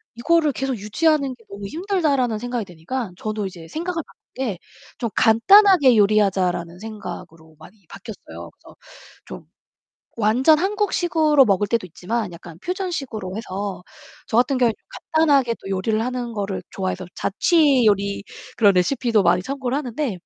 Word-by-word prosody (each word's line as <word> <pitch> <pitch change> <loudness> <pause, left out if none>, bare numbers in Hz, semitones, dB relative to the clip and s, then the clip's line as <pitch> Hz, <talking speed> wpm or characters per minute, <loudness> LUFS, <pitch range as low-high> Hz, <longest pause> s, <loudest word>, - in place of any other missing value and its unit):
'이거를 310 +4 +2
계속 270 -1 -2
유지하는 275 +6 0
게 230 - -24
너무 200 0 -8
힘들다.'라는 305 - 0
생각이 245 -2 -3
드니까 180 +6 -5
저도 215 -1 -3
이제 170 -3 -11
생각을 335 0 -3
바꾼 - - -24
게 230 -9 -3 0.4
'좀 235 -3 -2
간단하게 285 - +6
요리하자.'라는 185 -5 +1
생각으로 180 -7 -9
많이 190 +4 -17
바뀌었어요. 210 +1 -10
그래서 - - -19 0.5
좀 - - -10 0.7
완전 245 +8 +4
한국식으로 350 -7 +2
먹을 200 0 +2
때도 230 -5 0
있지만 205 +4 -4
약간 170 -1 -11
퓨전식으로 275 - -4
해서 200 -3 -5 0.5
저 220 - -1
같은 255 +2 +2
경우엔 240 -2 +3
좀 - - -45 0.3
간단하게 280 -7 +4
또 195 - -10
요리를 215 +3 0
하는 250 -1 -4
거를 200 -3 -4
좋아해서 185 -1 -4
자취 285 - +3
요리 200 -1 +1 0.3
그런 205 -4 +5
레시피도 230 +3 +2
많이 175 +1 +3
참고를 270 +2 -3
하는데 260 -2 -3
230 Hz, 365 characters per minute, -22 LUFS, 195-275 Hz, 0.7 s, 간단하게